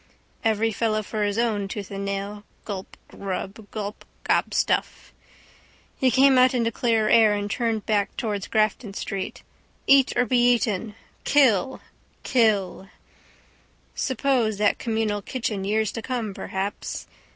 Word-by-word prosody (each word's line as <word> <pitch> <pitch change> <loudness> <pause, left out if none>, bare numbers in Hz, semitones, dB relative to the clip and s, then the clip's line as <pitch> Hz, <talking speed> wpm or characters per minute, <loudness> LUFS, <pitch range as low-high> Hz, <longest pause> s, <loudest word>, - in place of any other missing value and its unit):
Every 225 0 +2
fellow 215 0 0
for 210 +1 -3
his 205 0 -1
own, 220 -4 0
tooth 200 0 -6
and 195 0 -4
nail. 200 +1 -4 0.2
Gulp. 195 -3 -7
Grub. 200 +2 -6
Gulp. 210 -1 -6 0.2
Gobstuff. - - 0 0.8
He 260 - +2
came 265 +1 +5
out 255 0 +5
into 230 -2 +1
clearer 225 -1 +1
air 220 -2 +5
and 205 0 -3
turned 225 -3 -1
back 210 -2 0
towards 210 -5 -2
Grafton 215 -1 0
street. 195 -2 -5 0.4
Eat 275 -1 +5
or 250 - +3
be 245 +1 +2
eaten. 230 -4 +1 0.3
Kill! 265 -4 +3 0.4
Kill! 205 -6 +1 1.0
Suppose 255 -5 0
that 205 0 +2
communal 220 -2 -1
kitchen 215 -3 -3
years 215 +1 0
to 225 - -5
come 230 -4 -3
perhaps. 190 +1 -4
215 Hz, 130 wpm, -24 LUFS, 205-235 Hz, 1.0 s, came